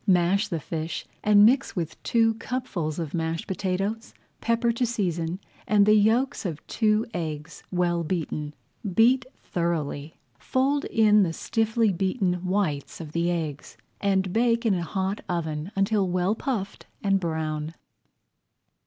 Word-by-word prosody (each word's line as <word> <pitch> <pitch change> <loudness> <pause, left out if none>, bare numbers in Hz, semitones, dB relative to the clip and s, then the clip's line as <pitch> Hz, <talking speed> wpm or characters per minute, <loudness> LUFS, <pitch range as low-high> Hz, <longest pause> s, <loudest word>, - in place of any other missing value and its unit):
Mash 190 +3 +3
the 165 - -2
fish 160 +2 -4 0.2
and 210 -1 +7
mix 260 +5 +3
with 165 -4 -4
two 225 -1 +3
cupfuls 175 - -3
of 165 -4 -4
mashed 165 -1 -2
potatoes, 195 +4 -2 0.2
pepper 235 0 +1
to 235 +2 -1
season, 180 -7 -1 0.3
and 205 -1 +5
the 210 - +6
yolks 230 +6 +3
of 165 -6 -5
two 215 -1 +2
eggs 155 -2 -5
well 175 -2 +1
beaten. 155 -3 -3 0.4
Beat 250 +3 +5 0.2
thoroughly, 160 -3 -2 0.2
fold 275 +2 +1
in 210 -2 +4
the 170 -4 +1
stiffly 225 +2 +1
beaten 185 -1 0
whites 180 -7 -1
of 160 -3 -7
the 170 +2 0
eggs, 160 -5 -4 0.2
and 190 -2 +1
bake 235 +1 +2
in 220 - +4
a 180 - 0
hot 190 +4 -2
oven 160 0 -2
until 195 0 +2
well 180 +3 +1
puffed 220 -4 -4 0.2
and 195 -1 +3
brown. 160 -2 -3
190 Hz, 140 wpm, -26 LUFS, 165-220 Hz, 0.4 s, and